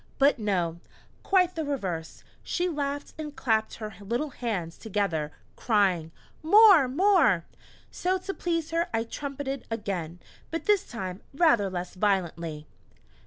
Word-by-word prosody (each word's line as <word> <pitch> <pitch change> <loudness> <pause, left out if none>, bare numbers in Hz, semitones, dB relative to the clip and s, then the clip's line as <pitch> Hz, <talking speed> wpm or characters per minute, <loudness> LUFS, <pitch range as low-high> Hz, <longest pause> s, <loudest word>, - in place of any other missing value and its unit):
But 280 -1 +4
no, 175 -6 -1 0.4
quite 365 -2 +3
the 320 - -3
reverse; 190 - -4 0.2
she 355 +1 -1
laughed 285 -3 -3
and 300 -1 -6
clapped 220 -4 0
her 215 -2 -7
little 240 +9 -2
hands 195 -10 -4
together, 190 -8 -1 0.2
crying: 190 -8 +1 0.3
"More 385 - +7
more!" 275 - +3 0.5
So 370 +1 0
to 380 +1 -5
please 330 -4 -2
her 335 +1 +1
I 225 - +1
trumpeted 275 +2 -5
again 190 -7 -4 0.3
but 330 - -4
this 415 -2 +3
time 190 -5 -5
rather 240 - +4
less 180 -1 -5
violently! 170 -6 -1
230 Hz, 130 wpm, -27 LUFS, 185-310 Hz, 0.5 s, More